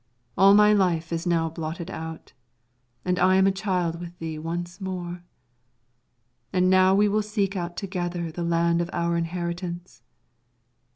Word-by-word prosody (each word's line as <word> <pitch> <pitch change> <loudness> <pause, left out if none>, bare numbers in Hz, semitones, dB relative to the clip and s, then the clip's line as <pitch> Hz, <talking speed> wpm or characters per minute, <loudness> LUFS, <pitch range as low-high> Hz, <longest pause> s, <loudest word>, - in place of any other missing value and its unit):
All 195 +1 +7
my 210 0 +6
life 170 -5 +1
is 165 +2 -2
now 165 -1 +2
blotted 165 +2 -5
out, 160 0 -7 0.7
and 180 0 0
I 185 - +4
am 190 0 +5
a 195 - +4
child 180 -4 -1
with 175 0 -9
thee 160 -1 -5
once 175 +4 -5
more. 180 -2 -5 1.3
And 185 0 +3
now 185 0 +5
we 205 +1 +4
will 210 +1 +1
seek 205 -2 -1
out 175 -1 -4
together 175 -4 -3
the 175 - -6
land 170 0 +2
of 170 - -3
our 170 0 0
inheritance. 175 +1 -4
175 Hz, 155 wpm, -25 LUFS, 170-190 Hz, 1.3 s, All